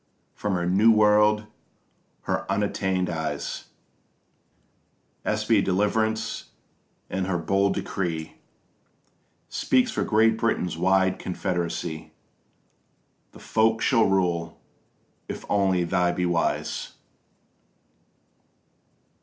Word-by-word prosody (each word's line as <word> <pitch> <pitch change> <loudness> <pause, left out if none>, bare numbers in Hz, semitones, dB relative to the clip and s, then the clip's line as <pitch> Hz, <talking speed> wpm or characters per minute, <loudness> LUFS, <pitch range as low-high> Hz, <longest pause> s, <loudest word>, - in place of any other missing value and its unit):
From 105 -2 -2
her 85 -1 -1
new 100 +6 +5
world 105 0 +4 0.8
her - - -2
unattainted 95 -3 0
eyes 80 -1 -4 1.6
Espy 110 0 +2
deliverance, 110 +4 0 0.6
and 95 0 -2
her 95 -2 0
bold 95 +4 +1
decree 80 -4 -4 1.1
Speaks 130 -1 +1
for - - -1
Great 110 +1 +3
Britain's 110 -7 0
wide 95 +2 +2
confederacy: 85 -2 -3 1.2
The - - -13
folk 110 0 +1
shall 115 -3 +3
rule, 85 -3 0 0.7
if - - -6
only 95 -3 +2
they 90 +1 +1
be 90 0 -1
wise. 85 -1 -1
95 Hz, 85 wpm, -25 LUFS, 90-105 Hz, 1.6 s, new